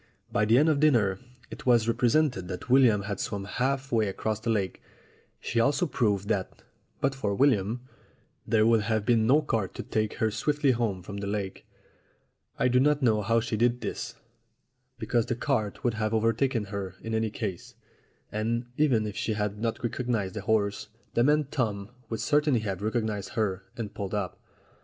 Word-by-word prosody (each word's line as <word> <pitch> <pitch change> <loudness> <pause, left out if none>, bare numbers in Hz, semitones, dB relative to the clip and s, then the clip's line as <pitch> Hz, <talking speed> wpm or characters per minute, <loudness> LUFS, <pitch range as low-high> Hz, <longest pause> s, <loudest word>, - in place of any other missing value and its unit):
By 105 - +2
the 115 +3 +5
end 150 +4 +5
of 155 -3 +3
dinner 115 -11 +3 0.3
it - - -9
was 120 -2 +4
represented 120 - +2
that 95 +6 -6
William 120 -6 +5
had 100 0 -4
swum 100 -1 -3
half 130 +5 -1
way 110 -3 +2
across 105 +2 -2
the 115 - -3
lake. 100 -4 -1 0.6
She 115 - -1
also 140 +7 +3
proved 105 - 0
that, 100 -4 -2 0.4
but 135 0 +2
for 105 -7 -2
William, 120 -3 +2 0.7
there 110 -1 +3
would 115 -1 +4
have 110 0 -1
been 115 -1 +3
no 145 +5 +5
cart 115 -9 -2
to - - -5
take 110 -1 -1
her 110 -1 0
swiftly 145 +5 +1
home 110 -7 -1
from 100 +2 -7
the 100 0 -4
lake. 100 -2 -4 0.9
I - - +2
do 125 0 +3
not 145 +1 +3
know 110 -3 +3
how 115 +3 +2
she 115 -1 -2
did 120 +2 +2
this, 115 0 -4 0.8
because 120 -3 0
the 120 - -1
cart 120 -5 -1
would 120 - +1
have 110 0 -1
overtaken 115 +2 +1
her 95 -2 -4
in 115 - -4
any 110 0 +1
case, 95 -4 -5 0.6
and, 115 +3 -1
even 130 -8 +3
if 105 -1 -5
she 110 0 -1
had 105 -1 -2
not 115 +3 -2
recognized 115 -5 -1
the - - -4
horse, 105 -3 0 0.3
the 120 - +3
man 150 +3 +4
Tom 105 -5 -2 0.2
would 115 - -3
certainly 145 -5 +2
have 100 -3 -3
recognized 110 -2 -2
her, 95 -4 -1
and 110 -3 -5
pulled 100 +1 -4
up. 100 -4 -3
110 Hz, 185 wpm, -28 LUFS, 105-125 Hz, 0.9 s, the